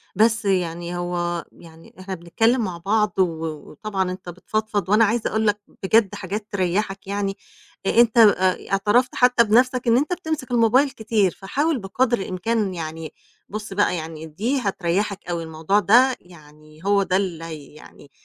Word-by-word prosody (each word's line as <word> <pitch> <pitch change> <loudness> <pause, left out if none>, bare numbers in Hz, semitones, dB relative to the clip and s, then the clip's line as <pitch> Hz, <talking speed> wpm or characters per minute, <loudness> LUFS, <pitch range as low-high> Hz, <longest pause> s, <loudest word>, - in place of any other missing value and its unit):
بس 225 +2 +2
يعني 175 -2 -1
هو 175 -1 -2
يعني 165 -1 -16
إحنا 190 +1 -6
بنتكلِّم 225 +9 +1
مع 185 -4 -4
بعض 210 +4 +1
و 165 -3 +1 0.3
وطبعًا 190 +2 -3
أنت 185 -1 -8
بتفضفض 205 +2 -3
وأنا 215 +2 +5
عايزة 225 +2 0
أقول 220 0 0
لك 210 0 +1 0.2
بجد 205 0 +3
حاجات 205 +2 -5
تريّحك 195 +1 -1
يعني. 200 0 -2 0.5
آآ - - +2
أنت 235 -1 +2
آآ 190 -5 +4
اعترفت 205 +6 +2
حتّى 250 -1 +5
بنَفْسك 250 +3 +2
إن 230 0 +5
أنت 295 +7 0
بتمسك 315 -8 -4
الmobile 245 +4 +3
كتير، 215 -4 +1
فحاول 280 - -1
بقدر 240 +5 0
الإمكان 195 +2 -2
يعني 160 -1 -6 0.4
بُص 210 -1 -6
بقى 200 -2 +2
يعني 160 -1 -6
دي 220 - -2
هتريحّك 195 -2 -2
أوي، 170 -1 -2
الموضوع 160 +5 0
ده 245 +6 +5
يعني 155 -2 -18
هو 200 0 +3
ده 185 -1 +1
اللي 180 -4 -3
هي 155 -4 -9
يعني 150 -2 -16
195 Hz, 160 wpm, -22 LUFS, 175-225 Hz, 0.5 s, وأنا